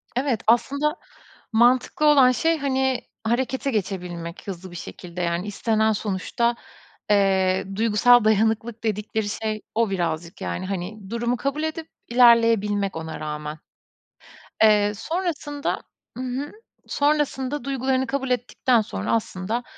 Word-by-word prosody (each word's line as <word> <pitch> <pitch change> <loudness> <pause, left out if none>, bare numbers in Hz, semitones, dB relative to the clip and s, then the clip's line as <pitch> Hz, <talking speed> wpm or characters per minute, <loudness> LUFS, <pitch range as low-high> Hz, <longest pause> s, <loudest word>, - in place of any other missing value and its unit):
Evet. 255 -4 0
Aslında 280 +6 +2 0.6
mantıklı 245 +6 +3
olan, 275 -4 +7
şey, 325 +6 +1
hani, 265 -3 0 0.2
harekete 260 +4 0
geçebilmek 180 -5 -4
hızlı 185 -1 -7
bir - - -10
şekilde. 175 +1 -7
Yani, 170 +2 -1
istenen 220 +1 +1
sonuçta, 215 +4 -1 0.5
eee, 190 -2 +3
duygusal 230 +3 +5
dayanıklılık 220 +2 +1
dedikleri 215 0 -2
şey 215 0 -3
o 230 -1 +2
birazcık. 170 -2 -3
Yani, 185 - -3
hani, 195 +2 -5
durumu 235 +2 -1
kabul 280 +4 -2
edip 315 0 -3 0.2
ilerleyebilmek 230 -5 +4
ona 160 0 -6
rağmen. 150 0 -5 1.0
Eee, 210 -1 +5
sonrasında, 300 - -3 0.4
hı 255 - -4
hı, 260 +3 -4 0.4
sonrasında 290 -2 0
duygularını 265 0 0
kabul 270 -1 -2
ettikten 250 -1 +1
sonra 215 - -4
aslında 220 +1 -2
225 Hz, 120 wpm, -24 LUFS, 195-260 Hz, 1.0 s, olan